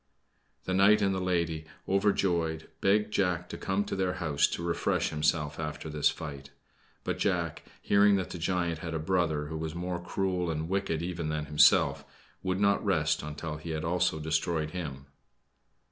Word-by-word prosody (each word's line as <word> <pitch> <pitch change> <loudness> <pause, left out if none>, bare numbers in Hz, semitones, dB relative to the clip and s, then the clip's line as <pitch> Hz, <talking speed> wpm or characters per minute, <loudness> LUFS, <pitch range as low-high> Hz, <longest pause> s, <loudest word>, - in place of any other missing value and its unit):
The 95 - -2
knight 100 +3 +6
and 95 -1 +2
the 95 - -2
lady, 85 -3 -1 0.2
overjoyed, 90 -5 +1
begged 105 +2 +2
Jack 90 -2 0
to - - -5
come 95 +2 -1
to - - -3
their 95 -2 0
house 80 -6 +1
to 85 - -4
refresh 85 -1 0
himself 75 0 0
after 75 0 -4
this 75 -1 +3
fight; 70 -2 -7 0.5
but - - -2
Jack, - - 0 0.2
hearing 100 0 +5
that 95 -2 -2
the 90 - -6
giant 85 -1 0
had 80 0 -4
a - - +1
brother 80 -3 0
who 80 +1 -5
was 80 0 -4
more 90 0 -3
cruel 90 0 -1
and 80 0 -2
wicked 95 -4 -1
even 85 -3 -3
than 75 -1 -2
himself, 75 -1 +4 0.4
would 95 0 -1
not 100 0 +3
rest - - +1
until 75 +1 -5
he 80 +2 -8
had 80 -1 -2
also 90 -1 +1
destroyed 80 0 -1
him. 70 -7 -6
85 Hz, 175 wpm, -29 LUFS, 75-95 Hz, 0.5 s, knight